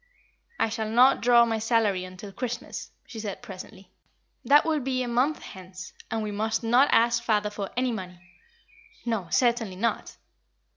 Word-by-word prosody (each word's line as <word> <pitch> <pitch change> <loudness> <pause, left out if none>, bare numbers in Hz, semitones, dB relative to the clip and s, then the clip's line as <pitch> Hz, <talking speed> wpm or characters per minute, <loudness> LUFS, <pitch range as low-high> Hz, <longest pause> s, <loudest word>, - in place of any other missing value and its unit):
"I - - +2
shall 220 -1 -3
not 250 +4 +5
draw 235 0 +6
my 225 -1 -1
salary 215 -5 +1
until 185 +2 -10
Christmas," 245 +3 -5 0.2
she 235 -4 -9
said, 210 +1 -6
presently. 195 -2 -11 0.5
"That 290 +2 +5
will 315 -2 +1
be 255 -1 -1
a - - -4
month 250 +6 0
hence; 185 -1 -10 0.2
and 225 -1 -2
we 210 - -3
must 220 +3 -1
not 245 +5 +4
ask 235 +1 +3
father 210 -2 0
for 205 -2 -5
any 255 0 +1
money." 180 -5 -6 0.9
"No, 225 -7 -2
certainly 235 -5 +1
not." 230 +5 -2
225 Hz, 160 wpm, -26 LUFS, 200-245 Hz, 0.9 s, draw